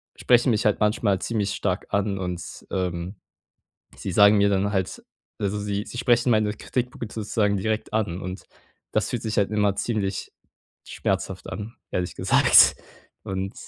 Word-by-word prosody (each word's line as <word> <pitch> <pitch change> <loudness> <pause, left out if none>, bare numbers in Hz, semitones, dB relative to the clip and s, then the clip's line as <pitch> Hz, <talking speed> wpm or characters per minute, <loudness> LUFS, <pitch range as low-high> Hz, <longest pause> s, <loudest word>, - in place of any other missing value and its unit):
sprechen 120 +1 +3
mich 110 - 0
halt 105 - +1
manchmal 105 -2 +2
ziemlich 105 -1 -1
stark 95 -1 -2
an 100 -1 0
und, 90 -2 -6
ähm, 90 0 -3 0.8
sie 95 - -5
sagen 105 +2 +6
mir 100 0 +4
dann 100 +1 +1
halt 95 -1 -2 0.4
also, 105 0 -1
sie 100 0 -2
sie 120 - -7
sprechen 120 0 +3
meine 110 -1 +2
Kritikpunkte 125 +1 -4
sozusagen 105 -2 0
direkt 110 +3 -2
an. 100 -5 -1
Und 90 +1 -6 0.5
das - - 0
fühlt 120 - -2
sich 110 -1 -3
halt 100 0 +2
immer 105 -2 +2
ziemlich 100 -2 -2 0.5
schmerzhaft - - -3
an, 105 +3 -6 0.2
ehrlich 90 -1 -2
gesagt. - - +6 0.5
Und 95 +1 -4
100 Hz, 155 wpm, -24 LUFS, 95-110 Hz, 0.8 s, sagen